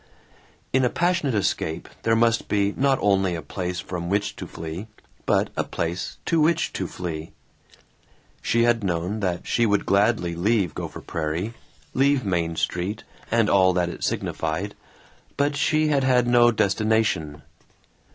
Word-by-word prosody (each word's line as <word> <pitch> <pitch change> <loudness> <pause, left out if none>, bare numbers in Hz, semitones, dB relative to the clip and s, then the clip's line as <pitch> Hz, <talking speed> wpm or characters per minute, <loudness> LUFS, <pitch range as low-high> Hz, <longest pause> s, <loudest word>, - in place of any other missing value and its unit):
In 130 0 +3
a 125 - +3
passionate 170 -7 +1
escape 85 -5 -1
there 115 0 +2
must 115 0 +2
be 100 0 +1
not 135 0 +2
only 95 -3 +2
a 85 - -4
place 90 -1 -4
from 90 -1 -5
which 100 +1 0
to - - -6
flee 80 +6 -7 0.4
but - - +2
a - - 0
place 85 +2 -4
to 165 -2 +2
which 160 +2 +2
to - - -2
flee. 80 -3 -6 1.1
She 115 0 +2
had 120 -2 +2
known 90 +3 -1
that 90 -4 -2
she 120 -1 +2
would 105 -1 +1
gladly 100 -3 +2
leave 95 -1 +1
Gopher - - -6
Prairie, 85 +7 -3 0.4
leave 135 -2 +2
Main 85 -3 0
Street 90 +6 -2 0.3
and 115 -2 +3
all 95 -2 +4
that 90 -1 +1
it - - -7
signified, 80 +6 -2 0.6
but 145 +1 +1
she 155 +2 +2
had 140 -2 +2
had 125 -2 +3
no 120 0 +5
destination. 105 -8 +1
100 Hz, 150 wpm, -24 LUFS, 90-120 Hz, 1.1 s, no